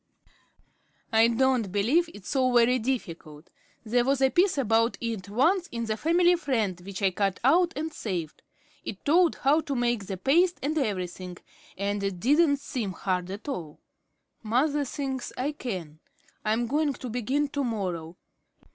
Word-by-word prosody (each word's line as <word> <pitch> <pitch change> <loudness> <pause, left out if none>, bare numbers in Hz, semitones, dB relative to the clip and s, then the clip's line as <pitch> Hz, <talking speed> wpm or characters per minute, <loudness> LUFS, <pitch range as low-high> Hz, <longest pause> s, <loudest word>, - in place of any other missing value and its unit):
"I 225 +1 +6
don't 235 -3 +1
believe 255 - +2
it's 200 - -11
so 260 -2 +2
very 245 +1 +4
difficult. 170 - -5 0.3
There 240 +2 +2
was 270 +1 +1
a 265 -1 +3
piece 365 -2 +3
about 230 -2 +2
it 220 -5 -4
once 335 - +2
in 235 -1 -3
the 215 -1 -1
'Family 345 +7 +3
Friend' 220 - -1
which 195 +1 -7
I 190 - +4
cut 195 0 -1
out 340 +7 +4
and 315 +2 -4
saved. 180 - -4 0.4
It - - -7
told 335 +3 +4
how 295 +4 +2
to 280 -3 -4
make 240 -5 0
the 190 - -4
paste 340 - +3
and 300 +3 -1
everything, 185 - -3 0.4
and 200 +1 -1
it 195 -2 -3
didn't 285 - +3
seem 250 -8 -4
hard 180 -1 -2
at 200 +8 -7
all. 165 - -5 0.6
Mother 280 +6 +1
thinks 265 -1 -4
I 270 +4 -1
can. 185 - -6 0.4
I'm 225 +3 +1
going 290 +4 0
to 255 - -8
begin 255 +5 -1
to 285 0 -2
morrow. 180 -8 -3
240 Hz, 160 wpm, -27 LUFS, 200-285 Hz, 0.6 s, I